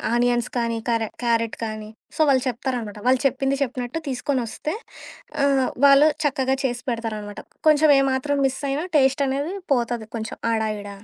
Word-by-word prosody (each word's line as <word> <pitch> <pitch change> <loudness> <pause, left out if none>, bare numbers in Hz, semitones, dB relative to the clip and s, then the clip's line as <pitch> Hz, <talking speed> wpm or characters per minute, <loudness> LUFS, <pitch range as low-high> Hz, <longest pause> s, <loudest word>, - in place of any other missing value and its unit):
Onions 240 -1 +2
కానీ, 230 -1 0
కరే 230 -1 +1 0.2
carrot 230 -1 +1
కానీ, 215 -1 -6 0.3
so, - - -12
వాళ్ళు 265 -2 +4
చెప్తారనమాట, 240 -3 -3
వాళ్ళు 255 0 +4
చెప్పింది 270 +1 +1
చెప్పినట్టు 250 +2 -4
తీసుకొనొస్తే, 260 +2 -2 0.7
ఆహ్, 275 -2 +3 0.2
వాళ్ళు 280 +2 +7 0.2
చక్కగా 265 -2 +1
చేసి 245 -2 -1
పెడతారనమాట. 215 -3 -4 0.3
కొంచం 305 0 +6
ఏ - - +4
మాత్రం 280 +2 0
మిస్ 265 0 -5
అయినా 295 +5 -2
టేస్ట్ 270 0 +3
అనేది 280 +6 -2 0.2
పోతది 235 -3 -1
కొంచెం 220 0 -6 0.2
ఆడ 220 - 0 0.2
ఈడ. 205 0 -8
255 Hz, 150 wpm, -23 LUFS, 230-275 Hz, 0.7 s, వాళ్ళు